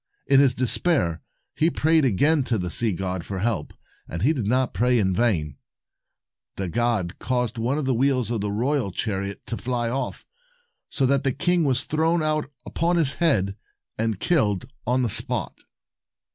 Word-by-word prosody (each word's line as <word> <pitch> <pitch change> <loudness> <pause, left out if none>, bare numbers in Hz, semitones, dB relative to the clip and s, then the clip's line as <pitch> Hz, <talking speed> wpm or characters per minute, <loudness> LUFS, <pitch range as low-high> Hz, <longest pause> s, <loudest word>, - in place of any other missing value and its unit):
In 135 - +5
his 135 -3 +4
despair 125 - +2 0.3
he 160 - +2
prayed 160 -2 +2
again 145 - +3
to 120 - 0
the 90 -3 -3
sea 115 +4 +2
god 95 -1 -3
for 95 - -5
help, 100 -5 -2 0.4
and 85 +1 -5
he 150 +6 +4
did 120 -9 -3
not 130 +2 +1
pray 120 +6 +2
in 95 -4 +1
vain. 90 - 0 1.0
The 95 -2 -3
god 115 -5 -1
caused 125 -2 -1
one 125 +5 0
of 150 - -2
the 130 - +1
wheels 130 -2 +1
of 115 -4 -1
the 100 0 -2
royal 120 0 0
chariot 100 +1 -3
to 115 - -4
fly 120 -2 -2
off, 135 +2 -4 0.6
so 135 - 0
that 135 +1 +2
the 135 - +2
king 175 +4 +1
was 130 -1 +2
thrown 160 +2 +1
out 155 -2 0 0.2
upon 170 +2 0
his 145 -5 +2
head, 100 - +2 0.4
and 110 -3 -2
killed 110 - +1 0.2
on 125 +1 +2
the - - +1
spot. - - -2
120 Hz, 175 wpm, -24 LUFS, 100-140 Hz, 1.0 s, In